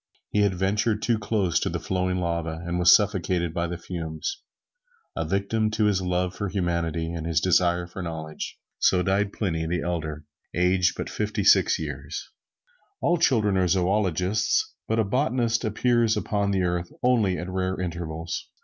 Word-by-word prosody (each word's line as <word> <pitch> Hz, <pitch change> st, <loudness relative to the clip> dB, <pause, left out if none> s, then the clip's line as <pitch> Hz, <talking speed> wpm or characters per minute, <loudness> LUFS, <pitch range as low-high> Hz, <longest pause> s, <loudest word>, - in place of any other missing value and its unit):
He 105 Hz, -, +2 dB
had 100 Hz, -2 st, +2 dB
ventured 105 Hz, +4 st, 0 dB
too 115 Hz, -3 st, +2 dB
close 105 Hz, -4 st, +1 dB
to -, -, -1 dB
the -, -, -3 dB
flowing 90 Hz, 0 st, -1 dB
lava, 85 Hz, -2 st, -2 dB
and 85 Hz, 0 st, -2 dB
was 90 Hz, 0 st, +7 dB
suffocated 90 Hz, -5 st, +2 dB
by 85 Hz, 0 st, -1 dB
the 85 Hz, 0 st, -4 dB
fumes, 85 Hz, -, -5 dB, 0.7 s
a -, -, -2 dB
victim 105 Hz, +3 st, 0 dB
to 110 Hz, 0 st, +1 dB
his 100 Hz, -3 st, +2 dB
love 90 Hz, 0 st, -1 dB
for 100 Hz, -2 st, -3 dB
humanity 85 Hz, -3 st, -1 dB
and 85 Hz, -1 st, -4 dB
his 80 Hz, -2 st, +2 dB
desire 90 Hz, 0 st, +2 dB
for 90 Hz, +2 st, -8 dB
knowledge. 80 Hz, -2 st, -6 dB, 0.2 s
So 90 Hz, -1 st, +3 dB
died 100 Hz, +2 st, +1 dB
Pliny 80 Hz, -7 st, -2 dB
the 85 Hz, 0 st, -1 dB
Elder, 80 Hz, -3 st, -3 dB, 0.3 s
aged 90 Hz, 0 st, +2 dB
but -, -, -3 dB
fifty -, -, -2 dB
six -, -, +5 dB
years. 75 Hz, -1 st, -6 dB, 0.7 s
All 175 Hz, -, +2 dB
children 110 Hz, -, +3 dB
are 90 Hz, -1 st, +3 dB
zoologists, 95 Hz, +2 st, +1 dB
but 110 Hz, -, 0 dB
a 110 Hz, -, +3 dB
botanist 120 Hz, 0 st, 0 dB
appears 115 Hz, +1 st, +2 dB
upon 100 Hz, -1 st, 0 dB
the 95 Hz, -2 st, +1 dB
earth 85 Hz, -1 st, -1 dB
only 110 Hz, -7 st, +3 dB
at 90 Hz, -, -5 dB
rare 95 Hz, 0 st, -2 dB
intervals. 85 Hz, -2 st, -4 dB
90 Hz, 165 wpm, -25 LUFS, 85-105 Hz, 0.7 s, was